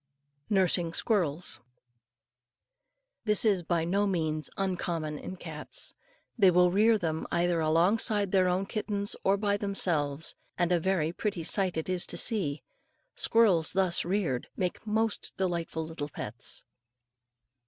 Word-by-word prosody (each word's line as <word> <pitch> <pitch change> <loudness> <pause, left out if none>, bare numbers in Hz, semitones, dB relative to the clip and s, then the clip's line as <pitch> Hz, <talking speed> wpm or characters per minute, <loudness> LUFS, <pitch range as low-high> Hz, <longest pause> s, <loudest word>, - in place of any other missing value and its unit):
NURSING 180 -4 +2
SQUIRRELS. 175 - 0 1.7
This 210 0 +4
is 200 -4 +3
by 170 -1 0
no 200 +4 +1
means 155 -5 -1
uncommon 170 -5 -2
in 185 - -7
cats. 160 -4 -3 0.5
They 195 -3 +7
will 180 0 +4
rear 220 +4 +4
them 160 -5 -3
either 175 0 +1
along 165 +7 +3
with 205 -3 0
their 185 -2 +3
own 180 +2 0
kittens 205 -1 -1
or 195 +1 +3
by 205 0 +1
themselves; 160 -7 0 0.2
and 175 -1 +1
a 175 - +3
very 170 -2 0
pretty 195 -3 -3
sight 185 0 +1
it 160 - -3
is 185 -1 0
to - - -2
see. 175 - +1 0.5
Squirrels 195 -9 +3
thus 185 -2 +2
reared 175 -9 -1
make 185 +4 -3
most 220 0 -1
delightful 170 -3 -2
little 155 -2 -6
pets. 120 -3 -5
180 Hz, 135 wpm, -29 LUFS, 160-200 Hz, 1.7 s, They